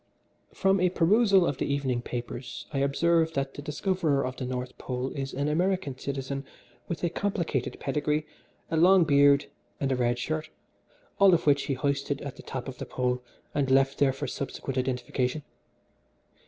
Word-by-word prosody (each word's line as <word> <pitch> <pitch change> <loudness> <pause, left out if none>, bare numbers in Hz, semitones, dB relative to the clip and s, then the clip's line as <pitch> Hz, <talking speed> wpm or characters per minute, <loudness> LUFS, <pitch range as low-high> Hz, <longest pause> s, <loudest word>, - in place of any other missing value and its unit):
"From 195 0 +2
a 180 0 +3
perusal 195 +2 +4
of 140 - -2
the - - -1
evening 130 -4 0
papers 120 0 -6
I 135 - 0
observe 160 +4 +2
that 135 -1 -2
the - - -7
discoverer 150 -2 0
of 130 0 -4
the 130 - -4
North 125 0 -4
Pole 125 +1 -3
is 135 0 -4
an 140 +2 -1
American 175 -2 0
citizen 135 0 -4 0.4
with 170 - -4
a 175 - +2
complicated 170 - -2
pedigree, 150 +2 0 0.5
a 165 - +1
long 180 +2 +6
beard 140 -2 +5 0.3
and 135 -1 0
a - - +2
red 120 -1 +1
shirt, 155 +4 -3 0.7
all 195 -3 +7
of - - -2
which 145 -1 +3
he 135 - -1
hoisted 140 +1 -1
to 140 0 -6
the - - -11
top 130 -2 -6
of 130 -2 -7
the - - -4
Pole 125 0 -1 0.3
and 140 -2 0
left 135 +1 +3
there 140 -2 +4
for 135 +2 -5
subsequent 135 0 -4
identification. 125 +2 -1
140 Hz, 175 wpm, -28 LUFS, 130-160 Hz, 0.7 s, all